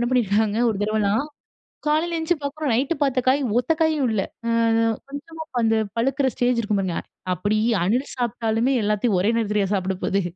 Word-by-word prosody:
என்ன 240 - +1
பண்ணிருக்காங்க 220 -3 +2
ஒரு 220 - 0
தடவலாம் 215 +4 +1 0.6
காலைல 320 +3 +1
எந்திச்சி 325 +2 +1
பாக்குறோம் 285 -1 -2
நைட்‌டு 270 +7 +1
பாத்த 270 -3 +2
காய் 270 +3 +4 0.2
ஒத்தக்காயும் 315 0 +1
இல்ல, 205 -3 +1 0.3
ம் 230 -1 +2
கொஞ்சமா 320 +3 -8 0.2
அந்த 225 0 +3 0.2
பழுக்குற 265 +3 +1
ஸ்டேஜ் 245 -1 +1
இருக்கும் 210 -2 0
பாருங்க 185 -3 -2 0.4
அப்படி 205 +5 0 0.3
அணில் 245 +9 0
சாப்ட்டாலுமே 235 +1 0
எல்லாத்தையு 210 0 +1
ஒரே 195 +4 +2
நேரத்துலயா 210 -3 +1
சாப்ட 190 -1 -1
போகுது? 200 0 +1
230 Hz, 155 wpm, -23 LUFS, 210-280 Hz, 0.6 s, காய்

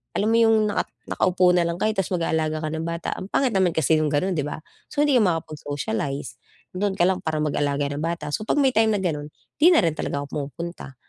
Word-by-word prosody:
alam 205 - +1
mo 230 - +4
yung 225 -1 +5
naka - - -1 0.2
nakaupo 180 -1 +2
na 175 - +3
lang 170 0 -3
kayo 215 +4 +1
tapos 195 -3 -1
mag 170 - -2
aalaga 155 -1 0
ka 155 - -1
ng 160 0 -3
bata, 170 0 -3
ang 185 - -6
pangit 265 +2 +1
naman 185 -3 +2
kasi 160 0 +3
yung 155 - +1
ganun, 170 +6 0
di 155 - 0
ba? - - -5 0.3
So 290 - +1
hindi 285 -3 +3
ka - - +3
makapag-socialize, 145 -5 -3 0.3
dun 195 +1 -1
ka 175 - +3
lang 185 0 +1
para 160 -3 -2
mag-aalaga 145 -1 0
ng 145 - -4
bata, 165 -3 -3
so - - -1
'pag - - +1
may 265 - +4
time 220 -2 +3
na 200 - -1
ganun 150 -4 -2 0.3
di 315 - +6
na - - +4
rin 165 - +2
talaga 140 -2 -3
ako - - -8
pumupunta. 150 0 -6
170 Hz, 245 wpm, -24 LUFS, 150-190 Hz, 0.3 s, di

